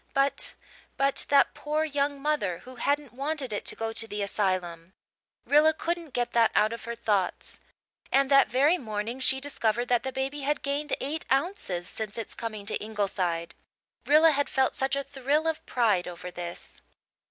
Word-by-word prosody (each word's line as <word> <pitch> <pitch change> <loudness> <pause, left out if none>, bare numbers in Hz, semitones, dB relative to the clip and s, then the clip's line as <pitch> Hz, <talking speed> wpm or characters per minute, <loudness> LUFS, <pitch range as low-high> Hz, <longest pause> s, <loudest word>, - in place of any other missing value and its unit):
But 275 +1 +2 0.4
but 275 0 +1
that 280 -1 +5
poor 305 +1 -1
young 285 -2 -1
mother 290 - -1
who 255 0 -11
hadn't 285 -3 -1
wanted 275 -2 -2
it 205 - -3
to - - 0
go 225 0 -3
to 225 0 +1
the 205 -1 -3
asylum! 185 -4 -2 0.5
Rilla 305 +2 +5
couldn't 335 -3 -3
get 245 -1 0
that 230 -1 +5
out 215 +2 +3
of 230 - -7
her 235 0 -4
thoughts. 210 -5 -1 0.5
And 275 0 +3
that 275 0 +7
very 285 +9 +3
morning 220 +1 -4
she 265 0 +1
discovered 240 -4 -1
that 245 -1 +3
the 265 - -4
baby 270 +2 -3
had 295 +2 -1
gained 285 +1 -2
eight 305 +4 -3
ounces 270 - 0
since 215 -1 -5
its 225 - -4
coming 215 -3 -5
to 215 - 0
Ingleside. 185 -5 -2 0.5
Rilla 315 +2 +7
had 285 -1 0
felt 265 -1 +2
such 270 +1 0
a 280 - -1
thrill 285 +4 0
of 320 -1 -2
pride 215 -7 +2
over 180 0 -7
this. 175 -1 -8
255 Hz, 175 wpm, -28 LUFS, 210-285 Hz, 0.5 s, that